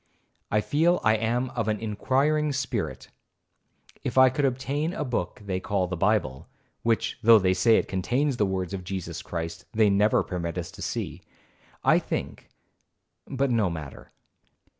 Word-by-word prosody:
I 105 Hz, -, +2 dB
feel 165 Hz, +9 st, +2 dB
I 110 Hz, +1 st, +4 dB
am 120 Hz, +3 st, -1 dB
of 115 Hz, -4 st, -2 dB
an 105 Hz, -1 st, 0 dB
inquiring 140 Hz, +8 st, +1 dB
spirit, 135 Hz, -1 st, -3 dB
and -, -, -34 dB
if -, -, -3 dB
I 130 Hz, -1 st, +7 dB
could 145 Hz, +2 st, 0 dB
obtain 135 Hz, +5 st, -1 dB
a 150 Hz, -, -2 dB
book 105 Hz, -5 st, -3 dB
they 95 Hz, -2 st, -2 dB
call 95 Hz, -1 st, 0 dB
the 90 Hz, +1 st, -4 dB
Bible, 90 Hz, -8 st, 0 dB, 0.3 s
(which, 115 Hz, -1 st, 0 dB
though 115 Hz, 0 st, +8 dB
they 95 Hz, -2 st, +2 dB
say 110 Hz, +5 st, +4 dB
it -, -, 0 dB
contains 125 Hz, +8 st, 0 dB
the 105 Hz, -, +2 dB
words 95 Hz, -1 st, -3 dB
of 95 Hz, -2 st, -4 dB
Jesus 95 Hz, 0 st, -5 dB
Christ, 85 Hz, -1 st, -5 dB
they 110 Hz, -2 st, +4 dB
never 105 Hz, +2 st, +3 dB
permit 85 Hz, -3 st, -4 dB
us -, -, -4 dB
to -, -, -12 dB
see) -, -, -4 dB, 0.6 s
I -, -, +5 dB
think—but 135 Hz, -1 st, -6 dB
no 110 Hz, -5 st, +2 dB
matter. 80 Hz, -4 st, -8 dB
110 Hz, 160 wpm, -26 LUFS, 95-130 Hz, 0.6 s, though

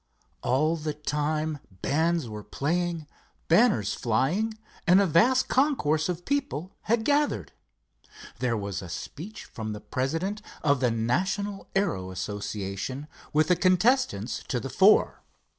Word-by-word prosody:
All 155 Hz, +6 st, +2 dB
the 155 Hz, -1 st, -3 dB
time 150 Hz, +1 st, -1 dB, 0.2 s
bands 160 Hz, 0 st, +1 dB
were 105 Hz, -1 st, -6 dB
playing, 170 Hz, +4 st, -1 dB, 0.4 s
banners 165 Hz, -, +4 dB
flying, 175 Hz, -, 0 dB, 0.3 s
and 180 Hz, +2 st, +7 dB
a 200 Hz, -, +4 dB
vast 240 Hz, +10 st, +4 dB
concourse 185 Hz, -, +2 dB
of 175 Hz, 0 st, -3 dB
people 265 Hz, -, -2 dB
had 220 Hz, 0 st, +1 dB
gathered. 290 Hz, 0 st, +1 dB, 0.9 s
There 120 Hz, -3 st, 0 dB
was 100 Hz, -2 st, -4 dB
a 90 Hz, -, -8 dB
speech 170 Hz, -, -7 dB
from 110 Hz, -2 st, -6 dB
the 105 Hz, -, -6 dB
president 165 Hz, -, -2 dB, 0.2 s
of 140 Hz, -3 st, +3 dB
the 125 Hz, -2 st, +2 dB
National 190 Hz, -, -1 dB
Aero 165 Hz, -, 0 dB
Association, 100 Hz, +6 st, -4 dB, 0.2 s
with 155 Hz, +2 st, +2 dB
the 180 Hz, -, +5 dB
contestants 220 Hz, +9 st, +2 dB
to -, -, -1 dB
the -, -, -6 dB
fore. -, -, +4 dB
155 Hz, 130 wpm, -27 LUFS, 125-195 Hz, 0.9 s, and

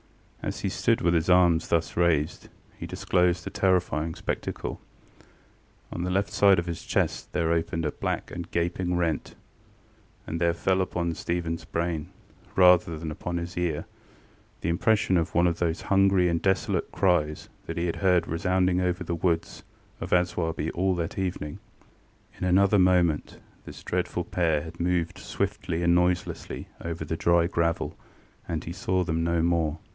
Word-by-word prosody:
As -, -, -4 dB
he -, -, 0 dB
stood -, -, +1 dB
with 85 Hz, 0 st, +2 dB
his 85 Hz, +1 st, +1 dB
arms 90 Hz, -2 st, +4 dB
thus 85 Hz, -1 st, 0 dB
raised, 85 Hz, -2 st, +1 dB, 0.3 s
he -, -, -7 dB
disclosed 90 Hz, -1 st, +1 dB
a -, -, -5 dB
terrifying 90 Hz, -4 st, +1 dB
spectacle. -, -, -4 dB, 1.1 s
On 85 Hz, -, -4 dB
the 90 Hz, -, -1 dB
left 95 Hz, +2 st, 0 dB
side 100 Hz, -2 st, +5 dB
of 85 Hz, -, 0 dB
his 85 Hz, -2 st, -4 dB
chest -, -, -1 dB
there 85 Hz, -2 st, +1 dB
opened 80 Hz, 0 st, -1 dB
a 75 Hz, -, 0 dB
black -, -, -3 dB
and 85 Hz, -1 st, -6 dB
gaping 85 Hz, +1 st, -1 dB
rent; 80 Hz, -4 st, -1 dB, 0.9 s
and 80 Hz, +1 st, -4 dB
there 85 Hz, 0 st, +2 dB
fell 95 Hz, +2 st, +1 dB
upon 85 Hz, -2 st, -1 dB
StephenŌĆÖs 85 Hz, 0 st, -3 dB
brain, 85 Hz, -2 st, -2 dB, 0.5 s
rather 90 Hz, -3 st, +5 dB
than 80 Hz, 0 st, -5 dB
upon 85 Hz, +3 st, -4 dB
his 85 Hz, +1 st, -5 dB
ear, 85 Hz, -4 st, -1 dB, 0.8 s
the -, -, -1 dB
impression 95 Hz, +3 st, +2 dB
of 85 Hz, 0 st, -1 dB
one 85 Hz, +1 st, +4 dB
of 85 Hz, -1 st, +1 dB
those 85 Hz, -1 st, 0 dB
hungry 95 Hz, -2 st, +3 dB
and 85 Hz, -1 st, 0 dB
desolate 95 Hz, 0 st, 0 dB
cries 80 Hz, -5 st, +1 dB, 0.2 s
that -, -, -5 dB
he 85 Hz, -, 0 dB
had 85 Hz, -, -2 dB
heard 90 Hz, -2 st, +3 dB
resounding 90 Hz, +2 st, +1 dB
over 90 Hz, 0 st, -1 dB
the 85 Hz, -, -3 dB
woods 85 Hz, -1 st, -1 dB, 0.4 s
of -, -, -4 dB
Aswarby 85 Hz, -3 st, 0 dB
all 95 Hz, +1 st, +1 dB
that 85 Hz, +2 st, -3 dB
evening. 90 Hz, -6 st, -3 dB, 0.8 s
In -, -, -5 dB
another 100 Hz, +3 st, +4 dB
moment 90 Hz, -4 st, +2 dB, 0.3 s
this -, -, -10 dB
dreadful 90 Hz, -1 st, -2 dB
pair 80 Hz, -4 st, 0 dB
had 85 Hz, +1 st, -10 dB
moved 85 Hz, -1 st, 0 dB
swiftly 80 Hz, +1 st, -2 dB
and 85 Hz, 0 st, +4 dB
noiselessly 90 Hz, 0 st, -1 dB, 0.2 s
over 85 Hz, -1 st, -4 dB
the 80 Hz, -, -2 dB
dry 85 Hz, +1 st, +3 dB
gravel, 85 Hz, -2 st, -1 dB, 0.5 s
and 80 Hz, -2 st, -3 dB
he 85 Hz, -, -6 dB
saw 95 Hz, 0 st, 0 dB
them 80 Hz, -1 st, -1 dB
no 85 Hz, -1 st, +1 dB
more. 85 Hz, -2 st, +1 dB
85 Hz, 165 wpm, -27 LUFS, 85-90 Hz, 1.1 s, side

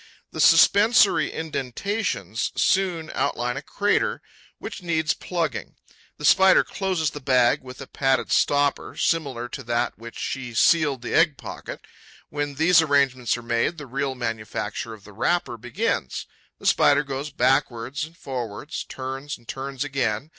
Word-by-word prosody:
The -, -, -3 dB
suspensory 200 Hz, -7 st, +5 dB
indentations 145 Hz, -, -3 dB
soon 180 Hz, -5 st, +1 dB
outline 125 Hz, -3 st, -1 dB
a -, -, -4 dB
crater 205 Hz, 0 st, 0 dB, 0.3 s
which -, -, -7 dB
needs 160 Hz, -3 st, 0 dB
plugging. 165 Hz, -7 st, -3 dB, 0.4 s
The 150 Hz, -, -5 dB
Spider 190 Hz, +5 st, +6 dB
closes 185 Hz, -6 st, -1 dB
the 145 Hz, -, -7 dB
bag 130 Hz, -2 st, +3 dB
with 125 Hz, -1 st, -11 dB
a -, -, -6 dB
padded 130 Hz, -3 st, 0 dB
stopper 145 Hz, -1 st, +1 dB
similar 135 Hz, -8 st, 0 dB
to 135 Hz, -, -6 dB
that 120 Hz, 0 st, -1 dB
with -, -, -21 dB
which 115 Hz, 0 st, -9 dB
she 130 Hz, -3 st, -4 dB
sealed 145 Hz, -1 st, +3 dB
the -, -, -4 dB
egg 160 Hz, -5 st, +4 dB
pocket. -, -, -8 dB, 0.4 s
When 145 Hz, -1 st, -3 dB
these 160 Hz, +3 st, +5 dB
arrangements 135 Hz, -6 st, +2 dB
are 120 Hz, -, -9 dB
made, 120 Hz, +8 st, 0 dB
the 150 Hz, -, -7 dB
real 135 Hz, +1 st, -2 dB
manufacture 115 Hz, -2 st, -4 dB
of 105 Hz, -, -19 dB
the 105 Hz, -, -14 dB
wrapper 175 Hz, -, 0 dB
begins. 115 Hz, -, -2 dB, 0.3 s
The -, -, -14 dB
Spider 145 Hz, +1 st, +4 dB
goes 140 Hz, +1 st, -5 dB
backwards 130 Hz, -1 st, 0 dB
and 165 Hz, +2 st, -9 dB
forwards, 125 Hz, 0 st, -5 dB
turns 135 Hz, +2 st, -6 dB
and 120 Hz, -, -25 dB
turns 135 Hz, 0 st, -4 dB
again. 135 Hz, -2 st, -2 dB
140 Hz, 150 wpm, -24 LUFS, 120-160 Hz, 0.4 s, Spider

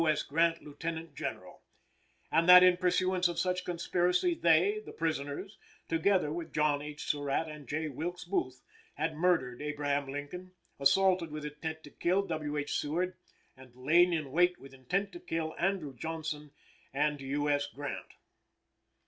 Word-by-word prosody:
S. 155 Hz, -1 st, +2 dB
Grant, 165 Hz, +2 st, +1 dB
Lieutenant 160 Hz, +2 st, -6 dB
General; -, -, -6 dB, 0.7 s
and 165 Hz, +2 st, +3 dB
that 180 Hz, 0 st, +11 dB
in 180 Hz, -1 st, +6 dB
pursuance 185 Hz, 0 st, +2 dB
of 175 Hz, -1 st, -4 dB
such 180 Hz, +1 st, 0 dB
conspiracy 180 Hz, -, +1 dB
they 185 Hz, -, +3 dB
(the -, -, -9 dB
prisoners) 160 Hz, +5 st, -3 dB, 0.3 s
together 165 Hz, -1 st, +2 dB
with 170 Hz, 0 st, -5 dB
John 150 Hz, -1 st, +1 dB
H. 150 Hz, 0 st, -7 dB
Surratt 145 Hz, +2 st, -1 dB
and 150 Hz, -3 st, -9 dB
J. 155 Hz, +4 st, -2 dB
Wilkes 170 Hz, +5 st, -5 dB
Booth, 130 Hz, -9 st, -2 dB, 0.3 s
had 160 Hz, +2 st, -1 dB
murdered 155 Hz, -8 st, +1 dB
Abraham 145 Hz, -1 st, -1 dB
Lincoln, 180 Hz, +6 st, -7 dB, 0.3 s
assaulted 180 Hz, +4 st, +3 dB
with 150 Hz, 0 st, -6 dB
intent 160 Hz, +2 st, -5 dB
to 145 Hz, -, -12 dB
kill 185 Hz, +7 st, +1 dB
W. 155 Hz, -4 st, -3 dB
H. 145 Hz, 0 st, -1 dB
Seward, 175 Hz, +5 st, -1 dB, 0.4 s
and 130 Hz, -2 st, -16 dB
lain 165 Hz, +8 st, +4 dB
in 155 Hz, -5 st, -2 dB
wait 180 Hz, +3 st, +3 dB
with 135 Hz, 0 st, -14 dB
intent 180 Hz, +10 st, -2 dB
to 345 Hz, -, -9 dB
kill 165 Hz, -, -3 dB
Andrew 175 Hz, -6 st, 0 dB
Johnson 155 Hz, +1 st, -5 dB, 0.4 s
and 145 Hz, +1 st, 0 dB
U. 145 Hz, +2 st, -1 dB
S. 145 Hz, 0 st, +1 dB
Grant. 145 Hz, 0 st, -7 dB
160 Hz, 155 wpm, -31 LUFS, 145-180 Hz, 0.7 s, that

